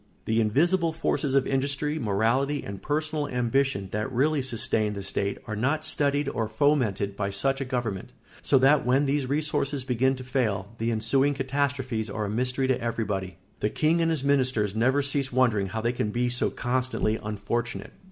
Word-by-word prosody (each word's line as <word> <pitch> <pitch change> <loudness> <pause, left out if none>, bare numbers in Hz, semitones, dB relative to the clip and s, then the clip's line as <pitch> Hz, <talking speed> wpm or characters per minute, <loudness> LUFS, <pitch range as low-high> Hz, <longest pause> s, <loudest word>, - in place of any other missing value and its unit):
The 110 +1 +2
invisible 165 - +2
forces 145 -3 -1
of 135 - +4
industry, 140 +3 -1
morality, 120 +7 +1
and 100 -1 -7
personal 150 +1 -1
ambition 125 -4 0
that 105 +1 -2
really 140 +4 +2
sustain 110 -4 0
the 100 -1 -5
state 100 +1 -2
are 110 -3 -4
not 135 +8 0
studied 145 0 +1
or 115 -5 -1
fomented 110 -6 +1
by 100 -1 -2
such 135 +8 0
a - - -1
government; 120 -6 -3 0.3
so 140 - +3
that 135 +3 +4
when 130 +4 +3
these 140 -2 0
resources 145 -2 0
begin 130 +1 +1
to 130 - -8
fail, 110 -6 -1
the 115 +1 0
ensuing 135 +6 +2
catastrophes 130 -4 -1
are 105 +1 -3
a - - -3
mystery 125 +4 0
to 130 -1 +1
everybody. 100 -6 -3 0.2
The 105 - 0
king 160 +7 +2
and 165 - +2
his 160 -5 -1
ministers 130 -7 +1
never 130 +5 +2
cease 140 -1 0
wondering 120 -6 +2
how 110 +4 -4
they 120 +2 0
can 105 - -1
be 120 +3 0
so 125 0 0
constantly 125 -3 -1
unfortunate. 105 +3 -3
130 Hz, 180 wpm, -26 LUFS, 110-140 Hz, 0.3 s, of